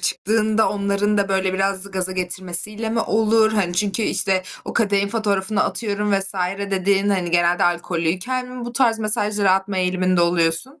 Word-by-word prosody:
çıktığında 215 +4 +1
onların 205 +1 -1
da, 200 -1 0
böyle 190 -1 0
biraz 195 0 0
gaza 185 -1 -1
getirmesiyle 185 +4 -1
mi 225 0 0
olur? 220 0 +2
Hani, 185 -5 -1
çünkü 205 +3 -1
işte, 190 -2 +1 0.2
o - - -6
kadehin 200 -3 +1
fotoğrafını 205 -2 -1
atıyorum 210 -2 -2
vs. 195 0 +2 0.4
dediğin, 195 +1 +1
hani, 185 -4 -1
genelde 175 0 +2
alkollüyken 175 +8 -2
mi 250 -1 -8
bu 240 - -7
tarz 235 -2 +2
mesajlar 210 -1 0
atma 190 0 +1
eğiliminde 185 -1 0
oluyorsun? 170 - +2
200 Hz, 155 wpm, -20 LUFS, 185-215 Hz, 0.4 s, olur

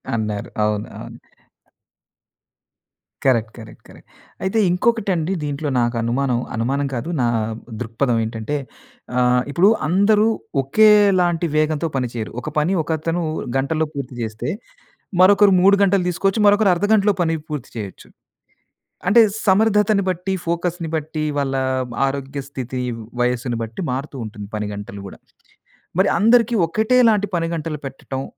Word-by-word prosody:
అన్నారు. 105 -2 -3
అవును. 105 0 0
అవును. - - -9 2.1
Correct, 115 -4 +2
correct, 110 -2 -12
correct. - - -17 0.4
అయితే 190 +4 0
ఇంకొకటి 220 +3 +1
అండి 165 +3 -1
దీంట్లో 145 +1 -3
నాకు 120 0 0
అనుమానం, 120 +1 0 0.2
అనుమానం 135 +5 -1
కాదు 125 +7 -4
నా 120 - +2 0.5
దృక్పథం 115 +1 0
ఏంటంటే 115 +5 -4 0.6
ఆహ్, 125 0 +3
ఇప్పుడు 180 +7 +4 0.2
అందరు 205 +5 +3 0.3
ఒకేలాంటి 185 0 +4
వేగంతో 155 +1 +1
పని 130 -2 0
చేయరు. 115 -2 -5
ఒక 150 - -5
పని 155 +6 +2
ఒకతను 165 +2 -2 0.3
గంటల్లో 155 +4 0
పూర్తి 135 -2 -6
చేస్తే, 110 +2 -4 0.7
మరొకరు 200 +2 +6
3 195 +2 +6
గంటలు 195 -1 +3
తీసుకోవచ్చు, 195 +4 0
మరొకరు 205 0 +4
అర్ధగంటలో 205 +2 +2
పని 165 -1 +1
పూర్తి 145 -4 -5
చేయొచ్చు. 105 -4 -7 1.0
అంటే 210 +5 +6 0.2
సమర్థతను 210 0 +3
బట్టి, 185 +1 -2
ఫోకస్‌ని 170 0 -2
బట్టి, 155 0 -3
వాళ్ళ 135 -1 -1 0.5
ఆరోగ్య 135 0 -4
స్థితి, 130 -1 -5 0.4
వయస్సుని 125 -1 -1
బట్టి 110 +9 -7
మారుతూ 140 +3 -4
ఉంటుంది 105 -2 -8
పనిగంటలు 105 -1 -5
గూడా. - - -12 0.8
మరి 195 - +4
అందరికీ 230 +2 +4
ఒకటే 220 +7 +2
లాంటి 205 -2 +1
పని 165 -1 -1
గంటలు 155 -2 -4
పెట్టటం 135 0 -6
155 Hz, 125 wpm, -20 LUFS, 125-195 Hz, 2.1 s, మరొకరు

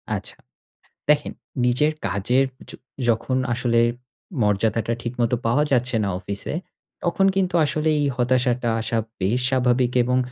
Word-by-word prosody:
আচ্ছা। - - -6 0.7
দেখেন 150 -1 +3 0.3
নিজের 125 +5 +3 0.2
কাজের 100 +8 +2 0.2
য - - -6 0.4
যখন 120 +3 +1 0.2
আসলে 115 -1 +1 0.6
মর্যাদাটা 110 +2 +1
ঠিকমত 120 0 -1
পাওয়া 120 +6 +3
যাচ্ছে 125 -1 +2
না 100 - 0
অফিসে, 100 +1 -4 0.5
তখন 180 +2 +2
কিন্তু 185 -2 +1
আসলে 155 +1 0
এই 145 - +2
হতাশাটা 125 -1 +1
আসা 115 +1 -1 0.2
বেশ 105 +7 +1
স্বাভাবিক, 125 -1 +2
এবং 125 +1 +1
125 Hz, 130 wpm, -23 LUFS, 115-130 Hz, 0.7 s, দেখেন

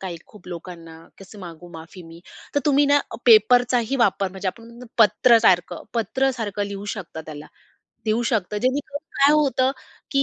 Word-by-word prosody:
काही 180 -3 -6
खूप 210 - -18
लोकांना. 170 -1 -9 0.2
"कसं 195 +2 -14
मागू 175 0 -11
माफी 165 +3 -11
मी?" 165 +1 -14 0.3
तर 285 - +2
तुम्ही 285 0 +3
ना 285 0 +4 0.3
पेपरचाही 245 +3 +4
वापर 200 -4 +1
म्हणजे 190 0 -4
आपण 235 +4 -10
पत्र 225 +3 +5
सारखं 180 -4 +2
पत्र 260 +4 0
सारखं 205 -2 -3
लिहू 200 0 -7
शकता 180 -6 -8
त्याला, 150 -1 -9 0.6
देऊ 220 +2 0
शकता 210 -2 -1
जेणेकरून 285 +3 -2 0.2
काय 280 +2 +5
होतं 270 -3 +2 0.4
की 275 -1 +2
215 Hz, 160 wpm, -22 LUFS, 180-255 Hz, 0.6 s, पत्र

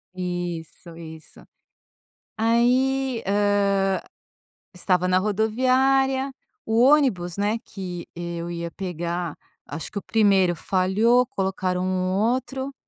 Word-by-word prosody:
Isso, 175 -2 -5
isso. 160 -1 -11 0.9
Aí, 250 +3 +2
hã, 200 -1 +2 0.7
estava 180 0 +1
na 185 0 +3
rodoviária, 260 +6 +2 0.3
o 225 +1 +2
ônibus, 250 - +3
né, 205 +3 0
que 180 -3 -7
eu 170 0 -5
ia 170 0 -4
pegar. 175 -2 -4 0.3
Acho 150 +2 -7
que 210 - -6
o - - -2
primeiro 195 -5 +3
falhou, 205 +9 +2
colocaram 190 -5 -2
um 185 0 -1
outro, 260 +6 -1
195 Hz, 105 wpm, -24 LUFS, 180-235 Hz, 0.9 s, na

